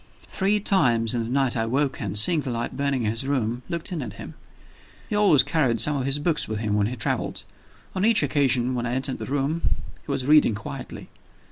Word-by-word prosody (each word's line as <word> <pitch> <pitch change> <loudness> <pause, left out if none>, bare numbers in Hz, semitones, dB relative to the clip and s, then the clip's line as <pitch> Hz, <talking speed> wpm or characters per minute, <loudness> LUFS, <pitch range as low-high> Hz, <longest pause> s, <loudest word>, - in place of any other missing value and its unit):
Three 200 +2 0
times 125 - +3
in 120 -2 -1
the 115 - -6
night 135 -1 +1
I 115 -1 -1
woke, 135 +3 0
and, 105 -1 -3
seeing 155 +10 +5
the 140 - -4
light 120 -1 -3
burning 140 -2 -1
in 105 - 0
his 115 +4 -2
room, 120 -3 -1
looked 170 +2 -4
in 170 -4 -3
at 110 -6 -6
him. - - -9 0.7
He - - -3
always 200 -9 +5
carried 130 -8 0
some 150 +7 +2
of 135 -1 -2
his 140 +1 0
books 150 +1 -1
with 110 - -3
him 105 -1 -2
when 105 -1 +2
he 125 - -4
traveled. 105 - -2 0.5
On 190 - -2
each 225 -5 +4
occasion 130 -3 +1
when 120 -1 -2
I 120 - -2
entered 130 0 -2
the - - -6
room, 145 +4 -1 0.4
he - - -6
was 135 -2 -2
reading 150 -6 +5
quietly. 100 - -8
130 Hz, 225 wpm, -24 LUFS, 115-150 Hz, 0.7 s, seeing